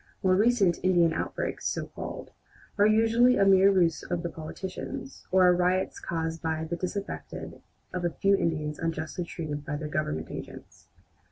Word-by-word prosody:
More 185 Hz, -1 st, +4 dB
recent 205 Hz, -4 st, +3 dB
"Indian 175 Hz, -3 st, +3 dB
outbreaks," -, -, -3 dB
so -, -, -2 dB
called, -, -, -8 dB, 0.4 s
are 205 Hz, 0 st, +5 dB
usually 225 Hz, +3 st, +4 dB
a 195 Hz, -, +4 dB
mere 195 Hz, 0 st, +6 dB
ruse 170 Hz, -5 st, +2 dB
of 175 Hz, -1 st, -3 dB
the 170 Hz, -, -3 dB
politicians, 160 Hz, -3 st, -7 dB
or 185 Hz, 0 st, +5 dB
are 180 Hz, -, +6 dB
riots 180 Hz, +1 st, +1 dB
caused 165 Hz, -1 st, -3 dB
by 160 Hz, -1 st, -1 dB
the 165 Hz, +2 st, -3 dB
disaffection 195 Hz, +3 st, -5 dB, 0.3 s
of 180 Hz, -1 st, -3 dB
a 175 Hz, -, +2 dB
few 195 Hz, +4 st, +2 dB
Indians 155 Hz, -4 st, -1 dB
unjustly 165 Hz, +1 st, -3 dB
treated 150 Hz, -4 st, -5 dB
by 145 Hz, -, -4 dB
their 150 Hz, 0 st, -4 dB
Government 80 Hz, -, -2 dB
agents. -, -, -10 dB
175 Hz, 165 wpm, -28 LUFS, 160-190 Hz, 0.4 s, mere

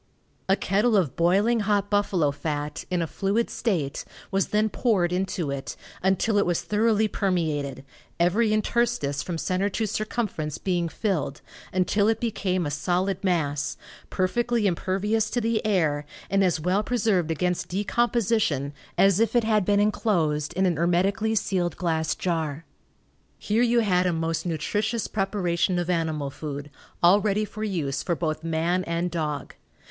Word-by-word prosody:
A 195 Hz, -, +6 dB
kettle 210 Hz, +4 st, +2 dB
of 170 Hz, -9 st, +1 dB
boiling 200 Hz, +8 st, +3 dB
hot 205 Hz, -1 st, 0 dB
buffalo 190 Hz, -7 st, +2 dB
fat, 150 Hz, 0 st, -4 dB
in 180 Hz, -2 st, 0 dB
a -, -, -1 dB
fluid 200 Hz, +7 st, -1 dB
state, 170 Hz, -, -1 dB, 0.3 s
was 195 Hz, 0 st, +1 dB
then 215 Hz, +1 st, +2 dB
poured 200 Hz, -6 st, +1 dB
into 180 Hz, -5 st, -1 dB
it, 140 Hz, -1 st, -5 dB, 0.3 s
until 195 Hz, +3 st, +2 dB
it -, -, +2 dB
was 175 Hz, -2 st, 0 dB
thoroughly 215 Hz, 0 st, +2 dB
permeated, 155 Hz, -10 st, -1 dB, 0.3 s
every 195 Hz, +7 st, +3 dB
interstice 215 Hz, -9 st, 0 dB
from 175 Hz, -2 st, -4 dB
center 185 Hz, +4 st, 0 dB
to 220 Hz, +3 st, -1 dB
circumference 210 Hz, -, -3 dB
being 175 Hz, -3 st, -1 dB
filled, 160 Hz, -8 st, -2 dB, 0.3 s
until 195 Hz, +3 st, +2 dB
it 225 Hz, 0 st, +2 dB
became 185 Hz, -6 st, -1 dB
a 145 Hz, -, -2 dB
solid 185 Hz, +5 st, -1 dB
mass, 155 Hz, -5 st, 0 dB, 0.3 s
perfectly 235 Hz, +4 st, 0 dB
impervious 200 Hz, +4 st, 0 dB
to 245 Hz, -, 0 dB
the 230 Hz, -1 st, 0 dB
air, 160 Hz, -9 st, +1 dB, 0.3 s
and 195 Hz, 0 st, +3 dB
as 175 Hz, -4 st, +2 dB
well 180 Hz, +6 st, +1 dB
preserved 205 Hz, -6 st, +1 dB
against 180 Hz, +2 st, -1 dB
decomposition 205 Hz, -, 0 dB, 0.2 s
as 195 Hz, 0 st, +5 dB
if 230 Hz, +2 st, +1 dB
it 240 Hz, -, +4 dB
had 215 Hz, -2 st, +2 dB
been 205 Hz, +1 st, +3 dB
enclosed 170 Hz, -8 st, +1 dB
in 190 Hz, +1 st, +1 dB
an 175 Hz, -4 st, +1 dB
hermetically 195 Hz, +6 st, +1 dB
sealed 180 Hz, -5 st, 0 dB
glass 160 Hz, -3 st, 0 dB
jar. 160 Hz, -3 st, -2 dB, 0.7 s
Here 215 Hz, +3 st, 0 dB
you 240 Hz, -1 st, +4 dB
had 180 Hz, -4 st, +2 dB
a 180 Hz, -, +1 dB
most 165 Hz, +1 st, -2 dB
nutritious 210 Hz, +8 st, -1 dB
preparation 190 Hz, -3 st, 0 dB
of 175 Hz, 0 st, 0 dB
animal 160 Hz, -5 st, -1 dB
food, 145 Hz, 0 st, -6 dB, 0.3 s
all 185 Hz, +4 st, +6 dB
ready 210 Hz, +1 st, +1 dB
for 215 Hz, +1 st, -7 dB
use 165 Hz, -10 st, -2 dB
for 170 Hz, -, -1 dB
both 155 Hz, -1 st, -2 dB
man 165 Hz, +3 st, 0 dB
and 170 Hz, +1 st, -1 dB
dog. 150 Hz, -4 st, -3 dB
185 Hz, 155 wpm, -25 LUFS, 165-210 Hz, 0.7 s, A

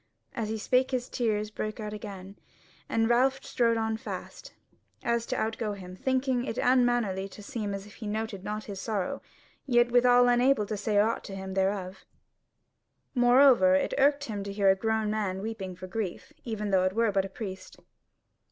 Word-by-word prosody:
As 220 Hz, -2 st, -3 dB
he 220 Hz, -, -2 dB
spake 255 Hz, +4 st, +2 dB
his 255 Hz, -1 st, -2 dB
tears 215 Hz, -3 st, -1 dB
brake 215 Hz, +1 st, -4 dB
out 210 Hz, -1 st, -5 dB
again, 200 Hz, -2 st, -8 dB, 0.5 s
and 225 Hz, 0 st, +2 dB
Ralph 260 Hz, +3 st, +2 dB
strode 230 Hz, -2 st, +1 dB
on 220 Hz, 0 st, -1 dB
fast, -, -, -7 dB
so -, -, -18 dB, 0.5 s
as 235 Hz, -1 st, 0 dB
to -, -, -2 dB
outgo 220 Hz, -1 st, -2 dB
him, 185 Hz, -2 st, -9 dB
thinking 260 Hz, +3 st, 0 dB
it 245 Hz, -, -4 dB
unmannerly 240 Hz, -6 st, +2 dB
to 210 Hz, -, -12 dB
seem 210 Hz, -1 st, -4 dB
as 195 Hz, 0 st, -7 dB
if 205 Hz, -, -14 dB
he 220 Hz, -, -6 dB
noted 215 Hz, -2 st, -3 dB
not 210 Hz, +1 st, -4 dB
his 195 Hz, -2 st, -7 dB
sorrow; 205 Hz, -5 st, -2 dB, 0.5 s
yet 240 Hz, -2 st, +3 dB
withal 245 Hz, 0 st, +5 dB
unable 245 Hz, -2 st, +3 dB
to 215 Hz, -, -3 dB
say 210 Hz, 0 st, -1 dB
aught 220 Hz, +3 st, +2 dB
to 195 Hz, -, -7 dB
him 190 Hz, 0 st, -6 dB
thereof. 190 Hz, 0 st, -1 dB, 1.1 s
Moreover 265 Hz, +2 st, +6 dB
it 285 Hz, -, 0 dB
irked 285 Hz, +1 st, +4 dB
him 210 Hz, -6 st, -4 dB
to 200 Hz, -, -5 dB
hear 200 Hz, -1 st, +4 dB
a -, -, +3 dB
grown 220 Hz, +1 st, 0 dB
man 200 Hz, -3 st, -2 dB
weeping 195 Hz, -3 st, -5 dB
for 185 Hz, +1 st, -9 dB
grief, 190 Hz, -1 st, -5 dB
even 210 Hz, -3 st, -3 dB
though 185 Hz, -1 st, +3 dB
it 185 Hz, -, 0 dB
were 230 Hz, 0 st, +2 dB
but 195 Hz, -1 st, +1 dB
a -, -, -7 dB
priest. 190 Hz, -2 st, -8 dB
220 Hz, 190 wpm, -28 LUFS, 195-240 Hz, 1.1 s, Moreover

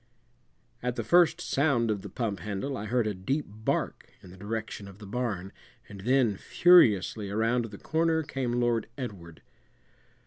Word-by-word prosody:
At 125 Hz, 0 st, -2 dB
the 115 Hz, -, -2 dB
first 170 Hz, +3 st, +4 dB
sound 135 Hz, -9 st, +1 dB
of 100 Hz, -2 st, -2 dB
the 100 Hz, -, -8 dB
pump 105 Hz, -1 st, -3 dB
handle 105 Hz, -, -4 dB
I 105 Hz, -, -5 dB
heard 120 Hz, +1 st, +1 dB
a 105 Hz, -, -1 dB
deep 135 Hz, +11 st, -2 dB
bark 110 Hz, +2 st, -3 dB
in 90 Hz, -, -12 dB
the 95 Hz, -, -13 dB
direction 110 Hz, 0 st, -5 dB
of 100 Hz, -1 st, -12 dB
the 105 Hz, -, -11 dB
barn, 100 Hz, -4 st, -3 dB, 0.4 s
and 100 Hz, -1 st, -10 dB
then 120 Hz, -2 st, +2 dB
furiously 110 Hz, -, +4 dB
around 115 Hz, +3 st, +1 dB
the 105 Hz, -3 st, -9 dB
corner 160 Hz, +3 st, +1 dB
came 135 Hz, -5 st, -3 dB
Lord 120 Hz, -2 st, +1 dB
Edward. 95 Hz, -, -8 dB
115 Hz, 165 wpm, -28 LUFS, 100-130 Hz, 0.4 s, first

